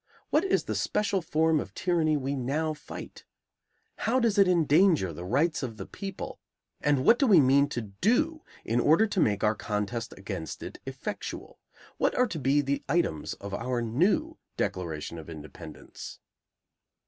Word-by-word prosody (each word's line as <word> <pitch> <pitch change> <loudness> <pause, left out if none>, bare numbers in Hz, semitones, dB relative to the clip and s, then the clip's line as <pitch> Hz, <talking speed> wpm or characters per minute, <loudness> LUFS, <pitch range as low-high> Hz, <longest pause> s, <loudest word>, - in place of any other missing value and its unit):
What 310 - +4
is 390 - +1
the - - -3
special 200 -2 0
form 160 0 +2
of 100 - -7
tyranny 165 -4 +1
we 140 0 -2
now 145 +5 -1
fight? 150 - -10 0.7
How 250 +3 +1
does 225 -4 +2
it 195 - +6
endanger 165 - +4
the 85 - -7
rights 150 - +1
of 120 -5 -5
the 95 - -6
people, 195 -1 -7 0.4
and 145 -2 +2
what 240 - +6
do 275 - +3
we 195 -7 +7
mean 140 +1 +4
to 120 - -3
do 245 - 0 0.2
in 115 +2 +1
order 160 - +5
to 205 -3 -2
make 105 - +2
our 105 0 +4
contest 105 +2 -3
against 95 -4 -6
it - - -8
effectual? - - -6 0.4
What - - +1
are 250 - +4
to 165 - -4
be 140 +2 +3
the 140 0 -2
items 120 - 0
of 100 0 -8
our 125 +3 -1
new 195 - +1 0.2
declaration 85 -4 -3
of 80 - -10
independence? 75 -3 -10
145 Hz, 165 wpm, -28 LUFS, -, 0.7 s, we